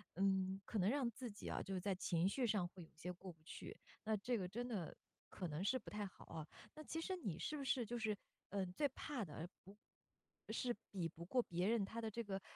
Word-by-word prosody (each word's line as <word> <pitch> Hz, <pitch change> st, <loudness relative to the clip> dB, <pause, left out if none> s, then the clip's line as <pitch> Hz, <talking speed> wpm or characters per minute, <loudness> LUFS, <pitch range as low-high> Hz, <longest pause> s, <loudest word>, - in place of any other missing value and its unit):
嗯， 190 Hz, 0 st, +4 dB
可 215 Hz, -, +1 dB
能 185 Hz, +3 st, +6 dB
让 265 Hz, -2 st, +4 dB
自 245 Hz, +1 st, -4 dB
己 205 Hz, -, -5 dB
啊， -, -, +1 dB
就 195 Hz, -, -2 dB
是 185 Hz, -, +1 dB
在 200 Hz, 0 st, +3 dB
情 175 Hz, -1 st, +3 dB
绪 255 Hz, +3 st, +3 dB
上 205 Hz, -4 st, +4 dB
会 180 Hz, -2 st, -8 dB
有 -, -, -13 dB
些 175 Hz, +3 st, -3 dB
过 180 Hz, +1 st, -6 dB
不 160 Hz, -, -28 dB
去。 -, -, -6 dB, 0.3 s
那 220 Hz, 0 st, +4 dB
这 240 Hz, +4 st, +2 dB
个 185 Hz, -2 st, 0 dB
真 240 Hz, +6 st, -1 dB
的 195 Hz, -9 st, -1 dB, 0.3 s
可 180 Hz, -, -2 dB
能 150 Hz, +2 st, -1 dB
是 260 Hz, +6 st, +4 dB
不 -, -, -8 dB
太 210 Hz, 0 st, -1 dB
好 190 Hz, -, -9 dB
啊。 155 Hz, -1 st, -4 dB, 0.3 s
那 310 Hz, -, -6 dB
其 325 Hz, +1 st, -1 dB
实 375 Hz, +2 st, +1 dB
你 190 Hz, -, -1 dB
是 305 Hz, -, 0 dB
不 280 Hz, -, -1 dB
是 260 Hz, -1 st, +4 dB
就 240 Hz, +2 st, -1 dB
是， 215 Hz, -2 st, +2 dB, 0.3 s
呃， 195 Hz, -2 st, +2 dB
最 285 Hz, +11 st, +3 dB
怕 260 Hz, -4 st, -2 dB
的， 160 Hz, +2 st, -4 dB, 0.2 s
不 195 Hz, +2 st, -11 dB, 0.8 s
是 245 Hz, -2 st, +2 dB, 0.2 s
比 180 Hz, -4 st, +1 dB
不 170 Hz, +2 st, -7 dB
过 250 Hz, +6 st, +5 dB
别 175 Hz, +3 st, +2 dB
人 225 Hz, -2 st, +5 dB
他 225 Hz, +3 st, -3 dB
的 220 Hz, -, 0 dB
这 235 Hz, +2 st, -1 dB
个， 195 Hz, -2 st, -1 dB
200 Hz, 265 characters per minute, -43 LUFS, 180-240 Hz, 0.8 s, 能